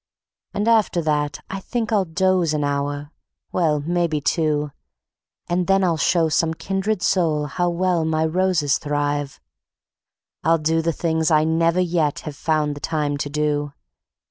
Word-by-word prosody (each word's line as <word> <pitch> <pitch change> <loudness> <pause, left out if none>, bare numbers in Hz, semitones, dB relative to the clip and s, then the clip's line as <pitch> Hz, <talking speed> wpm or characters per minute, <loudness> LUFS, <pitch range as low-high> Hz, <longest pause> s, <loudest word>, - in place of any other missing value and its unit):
And 205 +2 -1
after 220 -6 +3
that 150 -1 -1
I 195 - -3
think 225 +2 -3
I'll 205 -3 +2
doze 180 -1 +1
an 150 - 0
hour, 145 +1 -2 0.4
well, 155 -4 +1
maybe 170 0 0
two, 150 -1 0 0.8
And 175 0 0
then 195 0 +3
I'll 175 -3 +2
show 165 +2 +2
some 160 +1 +1
kindred 195 +3 -2
soul 160 -5 +1
how 175 +5 -1
well 175 -1 +1
my 160 0 +1
roses 165 -4 +1
thrive; 145 -1 -2 1.0
I'll 165 +1 +4
do 160 +1 +1
the 165 +1 0
things 160 0 0
I 155 -1 +4
never 165 +2 +2
yet 165 -5 0
have 150 -2 -7
found 150 -1 0
the - - -8
time 150 -2 -1
to 145 - -3
do. 145 -1 -1
160 Hz, 155 wpm, -22 LUFS, 150-180 Hz, 1.0 s, I'll